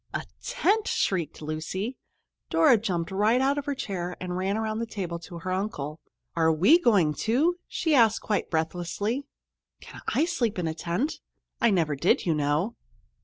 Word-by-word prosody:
"A -, -, -2 dB, 0.2 s
tent!" 420 Hz, +4 st, +1 dB
shrieked 165 Hz, -5 st, -1 dB
Lucy. 160 Hz, +10 st, -3 dB, 0.5 s
Dora 265 Hz, -8 st, +5 dB
jumped 180 Hz, -6 st, -2 dB
right 210 Hz, +5 st, +3 dB
out 275 Hz, +2 st, +2 dB
of 280 Hz, -, -6 dB
her 285 Hz, -, -1 dB
chair 180 Hz, -8 st, -4 dB
and 180 Hz, -1 st, -4 dB
ran 190 Hz, +3 st, 0 dB
around 220 Hz, 0 st, -2 dB
the 230 Hz, -, -2 dB
table 180 Hz, -6 st, -4 dB
to 170 Hz, +1 st, -9 dB
her 185 Hz, +2 st, -4 dB
uncle. 165 Hz, -6 st, -3 dB, 0.4 s
"Are 160 Hz, -1 st, +3 dB
we 190 Hz, -, +5 dB
going, 195 Hz, -, +3 dB
too?" 295 Hz, -, +1 dB
she 320 Hz, -3 st, 0 dB
asked 225 Hz, -5 st, +5 dB
quite 210 Hz, -, -1 dB
breathlessly. 180 Hz, -, -2 dB, 0.5 s
"Can -, -, -12 dB
I 315 Hz, -, +2 dB
sleep 245 Hz, -, -1 dB
in 175 Hz, -2 st, -1 dB
a 160 Hz, -, -1 dB
tent? 175 Hz, -, -2 dB, 0.4 s
I 235 Hz, -, +5 dB
never 165 Hz, -7 st, +1 dB
did, 155 Hz, +7 st, +2 dB
you 170 Hz, -, +2 dB
know." 150 Hz, +9 st, 0 dB
195 Hz, 170 wpm, -27 LUFS, 170-235 Hz, 0.5 s, Dora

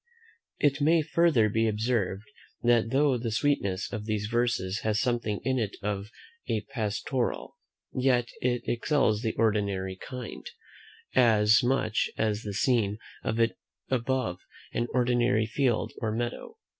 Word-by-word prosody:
It 145 Hz, -1 st, +2 dB
may 160 Hz, +2 st, +4 dB
further 160 Hz, -8 st, +3 dB
be 110 Hz, +2 st, +1 dB
observed, 105 Hz, -3 st, 0 dB, 0.4 s
that 120 Hz, -1 st, +3 dB
though 135 Hz, 0 st, +2 dB
the 115 Hz, 0 st, -2 dB
sweetness 110 Hz, -6 st, 0 dB
of 105 Hz, -2 st, -4 dB
these 105 Hz, -1 st, -1 dB
verses 115 Hz, -4 st, 0 dB
has 110 Hz, -1 st, 0 dB
something 115 Hz, -4 st, 0 dB
in 130 Hz, -1 st, +1 dB
it 105 Hz, -3 st, -3 dB
of 100 Hz, 0 st, -3 dB, 0.4 s
a 110 Hz, -, +1 dB
pastoral, 115 Hz, +2 st, -2 dB, 0.4 s
yet 125 Hz, -2 st, +2 dB
it 125 Hz, -1 st, 0 dB
excels 120 Hz, -3 st, +1 dB
the 110 Hz, -2 st, -2 dB
ordinary 100 Hz, -4 st, 0 dB
kind, 125 Hz, +2 st, -7 dB, 0.6 s
as 110 Hz, -3 st, +5 dB
much 125 Hz, -3 st, +1 dB
as 110 Hz, -1 st, 0 dB
the 100 Hz, -3 st, -5 dB
scene 110 Hz, -3 st, +2 dB, 0.3 s
of 110 Hz, +1 st, -1 dB
it 115 Hz, 0 st, +4 dB
is -, -, -30 dB, 0.3 s
above 130 Hz, -7 st, 0 dB, 0.3 s
an 120 Hz, +1 st, 0 dB
ordinary 120 Hz, -2 st, +2 dB
field 120 Hz, 0 st, 0 dB
or 110 Hz, -, 0 dB
meadow. 120 Hz, -, -4 dB
115 Hz, 140 wpm, -28 LUFS, 105-125 Hz, 0.6 s, as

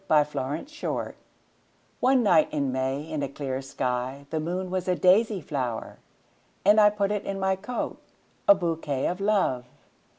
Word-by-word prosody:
My 150 Hz, -1 st, +6 dB
Flower 145 Hz, +1 st, -4 dB, 1.3 s
ONE 255 Hz, -1 st, +4 dB
night 170 Hz, -7 st, +4 dB
in 140 Hz, -3 st, 0 dB
May 130 Hz, +2 st, -1 dB
in 155 Hz, -1 st, -4 dB
a 140 Hz, -, -2 dB
clear 135 Hz, -1 st, -4 dB
skyThe 135 Hz, +3 st, -3 dB
moon 180 Hz, +3 st, -3 dB
was 185 Hz, -1 st, -2 dB
a 180 Hz, -, +2 dB
daisy 195 Hz, +2 st, +3 dB
flower:And! 140 Hz, -, -2 dB, 0.2 s
put 200 Hz, 0 st, +1 dB
it 210 Hz, -1 st, -1 dB
in 195 Hz, 0 st, -4 dB
my 190 Hz, 0 st, +1 dB
coat,A 200 Hz, -1 st, -1 dB
bouquet 165 Hz, -7 st, -2 dB
of 180 Hz, +2 st, -2 dB
Love! 195 Hz, -12 st, +1 dB
160 Hz, 135 wpm, -26 LUFS, 135-190 Hz, 1.3 s, My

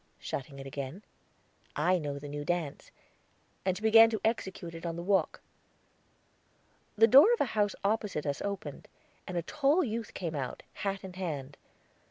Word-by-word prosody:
shutting 140 Hz, +1 st, -6 dB
it 135 Hz, -, -8 dB
again. 140 Hz, +7 st, -6 dB, 0.7 s
"I 180 Hz, 0 st, +2 dB
know 145 Hz, -3 st, -4 dB
the 145 Hz, +1 st, -8 dB
new 145 Hz, 0 st, -5 dB
dance"; 170 Hz, -3 st, -3 dB, 0.7 s
and 185 Hz, -1 st, 0 dB
she 210 Hz, -, -10 dB
began 225 Hz, +1 st, +8 dB
to 220 Hz, -1 st, -2 dB
execute 190 Hz, -6 st, -2 dB
it 165 Hz, -, -9 dB
on 170 Hz, -1 st, -3 dB
the 170 Hz, -, -5 dB
walk. 190 Hz, -3 st, +1 dB, 1.6 s
The 225 Hz, -, +8 dB
door 280 Hz, -, +8 dB
of 475 Hz, -, 0 dB
a -, -, +4 dB
house 205 Hz, -2 st, +1 dB
opposite 200 Hz, -6 st, 0 dB
us 140 Hz, -1 st, -2 dB
opened, 195 Hz, -8 st, -5 dB, 0.4 s
and 180 Hz, -, -4 dB
a 170 Hz, -, -1 dB
tall 295 Hz, -, +2 dB
youth 230 Hz, -3 st, -4 dB
came 170 Hz, -3 st, -3 dB
out, 135 Hz, -4 st, -4 dB
hat 195 Hz, -1 st, -3 dB
in 190 Hz, -1 st, -8 dB
hand. 150 Hz, -7 st, -4 dB
185 Hz, 170 wpm, -30 LUFS, 150-215 Hz, 1.6 s, began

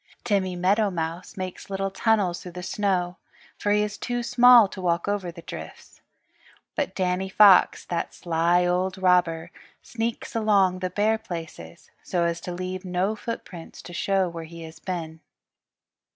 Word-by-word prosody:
Timmy 190 Hz, -4 st, 0 dB
Meadowmouse 180 Hz, -1 st, 0 dB
makes 185 Hz, 0 st, -6 dB
little 195 Hz, 0 st, -2 dB
tunnels 200 Hz, -5 st, +1 dB
through 180 Hz, -, -9 dB
the 180 Hz, 0 st, -7 dB
snow, 185 Hz, -2 st, -1 dB, 0.4 s
for 205 Hz, -, 0 dB
he 210 Hz, 0 st, +3 dB
is 210 Hz, 0 st, -5 dB
too 245 Hz, -1 st, -2 dB
small 245 Hz, -2 st, +7 dB
to 190 Hz, -, -8 dB
walk 170 Hz, 0 st, 0 dB
over 200 Hz, -4 st, -1 dB
the 170 Hz, -1 st, -12 dB
drifts. -, -, -10 dB, 0.7 s
But 285 Hz, -10 st, -2 dB
Danny 185 Hz, 0 st, -1 dB
Fox, 195 Hz, -1 st, +6 dB
that 170 Hz, -1 st, -3 dB
sly 170 Hz, +1 st, +1 dB
old 185 Hz, +2 st, 0 dB
robber, 175 Hz, -3 st, +2 dB, 0.3 s
sneaks 230 Hz, -1 st, -4 dB
along 200 Hz, -5 st, +3 dB
the 185 Hz, 0 st, -2 dB
bare 215 Hz, +4 st, +1 dB
places 165 Hz, -, -9 dB
so 175 Hz, -1 st, -1 dB
as 170 Hz, 0 st, -1 dB
to 180 Hz, -, -6 dB
leave 185 Hz, +1 st, -5 dB
no 185 Hz, +3 st, -1 dB
footprints 205 Hz, -7 st, -7 dB
to 175 Hz, -, -10 dB
show 195 Hz, +1 st, +1 dB
where 165 Hz, -1 st, -7 dB
he 165 Hz, +1 st, -10 dB
has 160 Hz, 0 st, -11 dB
been. 165 Hz, -4 st, -5 dB
185 Hz, 155 wpm, -25 LUFS, 175-205 Hz, 0.7 s, small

